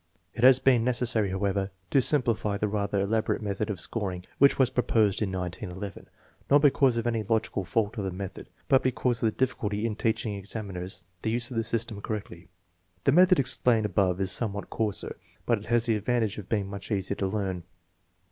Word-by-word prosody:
It 120 - -4
has 130 0 +8
been 130 -3 +3
necessary, 120 -4 +1
however, 95 0 -1 0.2
to 135 - +5
simplify 115 -7 +1
the 105 - 0
rather 100 -1 -1
elaborate 110 +2 0
method 100 +1 -2
of 100 -4 -3
scoring 90 +2 -3
which 140 0 +5
was 130 -2 +3
proposed 110 -5 +2
in 100 -3 0
1911, 95 +1 -6 0.4
not 145 +1 +5
because 135 -4 +4
of 115 - -1
any 115 -2 0
logical 110 -2 -1
fault 105 +4 -1
of 100 - -2
the - - -1
method, 95 +1 -7 0.2
but 135 - +5
because 125 -1 0
of 115 - +3
the - - +1
difficulty 110 -5 -1
in 110 -2 -1
teaching 110 -1 -1
examiners 100 -3 -6 0.2
to 110 - -1
use 120 +1 0
the 115 -3 -1
system 115 -2 -2
correctly. 95 -6 -6 0.6
The - - +4
method 180 +2 +6
explained 125 -4 +2
above 95 -2 +1
is 95 0 0
somewhat 100 -1 -3
coarser, 105 -4 -2 0.3
but 115 -3 +2
it 105 - -12
has 120 0 +2
the 115 -2 +2
advantage 110 -1 -1
of 100 - -10
being 105 -3 0
much 100 -1 -7
easier 100 -2 -1
to 95 - 0
learn. 95 -3 -2
110 Hz, 190 wpm, -27 LUFS, 100-120 Hz, 0.6 s, has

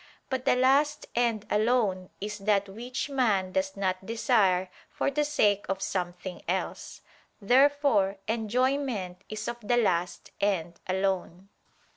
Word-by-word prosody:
But 260 -1 -2
the - - +4
last 275 +4 +3
end 230 -3 0
alone 210 -4 +1
is 210 +1 -5
that 200 0 +1
which 240 +7 -5
man 220 -9 +1
does 190 +1 -1
not 185 -1 -1
desire 205 -5 +2 0.2
for - - -1
the 295 +2 +1
sake 210 -9 +2
of 195 0 -1
something 180 -1 -4
else. - - -3 0.4
Therefore 245 -4 +3
enjoyment 230 -4 -1
is 215 0 -5
of 240 - -3
the 240 +3 +1
last 180 -6 0
end 175 -4 0
alone. 190 0 -2
210 Hz, 130 wpm, -28 LUFS, 190-250 Hz, 0.4 s, the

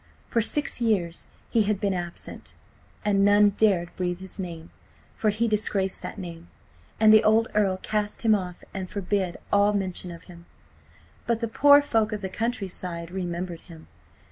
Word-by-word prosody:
For 230 - +2
six 280 +3 0
years 185 -7 0 0.2
he 230 - +3
had 210 -1 0
been 200 -2 0
absent, 175 -1 -7 0.5
and 200 -1 +3
none 205 0 +5
dared 195 -5 +1
breathe 180 -1 -2
his 190 +2 -9
name, 170 -3 -7 0.4
for 215 - +1
he 220 +3 0
disgraced 205 -3 0
that - - -7
name, 170 -3 -8 0.5
and 215 0 +7
the 215 - +7
old 220 +1 +3
Earl 195 -3 +2
cast 210 +3 -3
him 225 -1 +5
off 180 -4 -3
and 190 -2 -5
forbade 190 -2 -2 0.2
all 205 +1 +4
mention 185 -2 -1
of 170 0 -10
him. 170 -1 -14 0.8
But 235 -1 +1
the 230 - -2
poor 285 +5 +6
folk 225 -6 +1
of 210 - -4
the 190 - -4
countryside 185 -6 -4
remembered 175 -2 -4
him. 165 -2 -14
195 Hz, 170 wpm, -26 LUFS, 180-215 Hz, 0.8 s, and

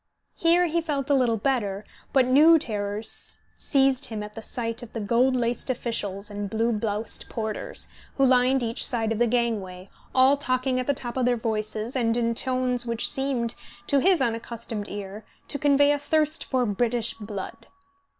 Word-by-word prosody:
Here 340 +2 +3
he 335 0 0
felt 290 -3 -2
a - - +6
little 245 -4 +2
better, 210 -4 -1 0.3
but 265 -2 +4
new 300 +6 +6
terrors 210 -4 -3 0.2
seized 270 -2 +2
him 215 -2 -5
at 210 0 -9
the 225 - -7
sight 230 0 -4
of 240 - -11
the 230 - -3
gold 240 +5 +2
laced 240 +1 -1
officials 210 -5 -3
and 205 -1 -4
blue 225 +3 0
bloused 215 0 -3
porters, 220 - -4 0.3
who 275 - +4
lined 255 0 +3
each 230 +1 -1
side 225 -3 +1
of 225 - -1
the 240 - +4
gangway, 205 -6 -2 0.2
all 265 +2 +5
talking 255 -1 0
at 255 - -3
the 285 - +2
top 245 -1 -5
of 255 - +1
their 245 -1 +2
voices, 220 +1 -3
and 230 -2 +1
in 230 -1 +1
tones 255 0 +1
which 235 -1 +1
seemed, 265 -4 0 0.3
to 280 - +3
his 355 -1 +3
unaccustomed 230 -2 -4
ear, 205 +1 -7 0.2
to 285 - -3
convey 285 0 +4
a 290 - +1
thirst 310 +1 +1
for 255 -2 0
British 230 +2 0
blood. 210 -3 -8
240 Hz, 180 wpm, -25 LUFS, 220-265 Hz, 0.3 s, a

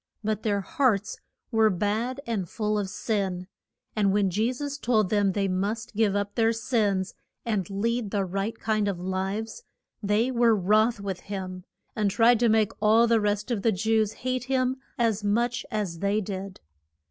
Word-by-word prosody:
But 215 0 -1
their 205 -2 0
hearts 240 - 0 0.3
were 220 -1 +4
bad 215 +7 -1
and 205 -7 -2
full 210 -1 -1
of 195 -2 -3
sin, 190 -4 -2 0.5
and 205 -2 +2
when 200 -1 +2
Je 220 +6 +1
sus 285 +2 -5
told 215 -7 +1
them 205 -2 +2
they 200 0 0
must 200 +4 -2
give 210 -2 +2
up 205 0 -1
their 225 -1 +2
sins 215 -6 0 0.3
and 210 -6 -1
lead 225 +3 -1
the 200 -1 0
right 195 +4 -3
kind 215 -2 0
of 195 -3 -2
lives, 190 - -3 0.4
they 215 +4 +1
were 235 -2 +4
wroth 215 +4 +2
with 195 -2 -4
him, 185 -2 -6 0.3
and 210 -2 +1
tried 230 +3 +4
to 235 -1 +3
make 220 -1 +3
all 220 +2 +5
the 230 -1 +3
rest 210 +2 -1
of 220 -4 0
the 225 - +3
Jews 220 +2 +1
hate 255 -1 -1
him 260 0 0 0.2
as 225 -4 +1
much 235 +4 0
as 205 -7 -3
they 200 +3 +1
did. 195 -1 -6
215 Hz, 175 wpm, -26 LUFS, 200-230 Hz, 0.5 s, all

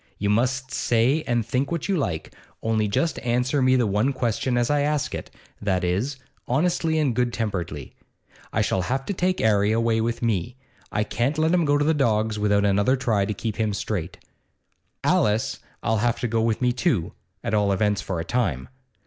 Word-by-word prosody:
You 100 0 0
must 130 +4 0
say 125 +7 +2
and 120 -2 +1
think 135 +4 -1
what 170 -3 -2
you 200 - +1
like, 90 - -2 0.3
only 110 -1 +1
just 160 +11 0
answer 125 +3 0
me 130 0 +4
the 125 -2 +3
one 105 +7 +1
question 125 0 -1
as 120 +2 +1
I 145 -1 +2
ask 150 0 0
it - - -5 0.3
that 95 -3 0
is, 100 +11 -1 0.3
honestly 160 +4 +1
and 145 -5 +2
good 125 0 +1
temperedly. 90 - -4 0.6
I - - +1
shall 95 - 0
have 135 +8 -2
to - - -2
take 185 0 0
'Arry 105 -1 +3
away 115 0 +2
with 115 +1 -2
me; 115 0 -1 0.4
I 105 - +1
can't 120 +7 -1
let 160 +2 +2
him 175 -2 +3
go 145 0 +3
to 145 - +1
the 160 - +3
dogs 110 -6 +1
without 105 -1 +2
another 100 +6 +3
try 115 -7 +1
to 105 - -2
keep 110 0 -4
him 110 -2 0
straight. 95 -4 -3 0.9
Alice 105 +1 +1 0.3
'll 110 - +2
have 115 +2 +1
to 120 - 0
go 115 0 0
with 115 +2 0
me 125 - +3
too, 125 - 0 0.3
at - - -2
all 105 -2 +3
events 105 +1 +1
for 90 -3 -3
a 80 - -3
time. 95 - -1
115 Hz, 200 wpm, -24 LUFS, 105-135 Hz, 0.9 s, me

